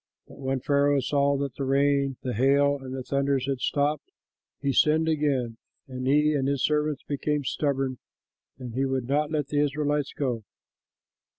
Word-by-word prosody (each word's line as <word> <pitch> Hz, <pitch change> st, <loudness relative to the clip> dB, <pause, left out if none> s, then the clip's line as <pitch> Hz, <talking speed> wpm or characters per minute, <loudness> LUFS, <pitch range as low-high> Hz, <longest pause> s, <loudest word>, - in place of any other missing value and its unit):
But -, -, -15 dB
when 135 Hz, -1 st, -2 dB
Pharaoh 140 Hz, 0 st, +2 dB
saw 140 Hz, +1 st, +1 dB
that 140 Hz, -2 st, -3 dB
the 140 Hz, -, -5 dB
rain 140 Hz, 0 st, +2 dB
and 125 Hz, -, -2 dB
the -, -, -3 dB
hail 140 Hz, +4 st, +3 dB
and 130 Hz, 0 st, -6 dB
the 130 Hz, -, -5 dB
thunders 140 Hz, 0 st, 0 dB
had 135 Hz, -2 st, -2 dB
stopped, 145 Hz, -, 0 dB, 0.5 s
he 140 Hz, -1 st, 0 dB
sinned 155 Hz, +3 st, +3 dB
again, 140 Hz, -7 st, 0 dB, 0.3 s
and 130 Hz, -1 st, -5 dB
he 150 Hz, +2 st, +4 dB
and 135 Hz, -2 st, 0 dB
his 140 Hz, -2 st, 0 dB
servants 150 Hz, -1 st, 0 dB
became 145 Hz, +1 st, -2 dB
stubborn, 135 Hz, -2 st, -1 dB, 0.6 s
and 125 Hz, -3 st, -8 dB
he 130 Hz, +3 st, 0 dB
would 130 Hz, -2 st, -1 dB
not 145 Hz, +2 st, +1 dB
let 150 Hz, -3 st, -2 dB
the 145 Hz, -, 0 dB
Israelites 145 Hz, 0 st, -1 dB
go. 125 Hz, -6 st, -2 dB
140 Hz, 175 wpm, -26 LUFS, 130-145 Hz, 0.6 s, he